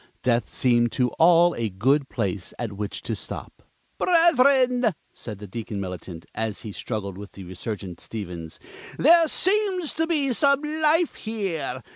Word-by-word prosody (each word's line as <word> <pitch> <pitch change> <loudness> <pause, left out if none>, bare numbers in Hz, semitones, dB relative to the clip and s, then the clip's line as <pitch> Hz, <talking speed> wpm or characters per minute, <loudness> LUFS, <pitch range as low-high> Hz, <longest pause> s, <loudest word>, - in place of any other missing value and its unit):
Death 120 -1 +1
seemed 120 -2 +2
to 125 -1 +1
all 170 +1 +6
a 115 -2 -2
good 135 +9 +1
place 100 -5 -3
at 115 -4 -4
which 100 0 -5
to - - -2
stop. - - -7 0.4
"Brethren," 260 - +4 0.2
said 110 -4 -8
the 105 - -9
Deacon 105 0 -6
Militant, 90 -3 -7
as 110 -2 -3
he 110 - -7
struggled 100 -3 -5
with 100 0 -10
the 95 - -10
resurgent 95 0 -6
Stevens, 90 -7 -7 0.4
"there 330 +3 +6
seems 375 -2 +1 0.4
some 280 +2 +3
life 310 +2 +2
here! 175 - -4
125 Hz, 140 wpm, -24 LUFS, -, 0.4 s, all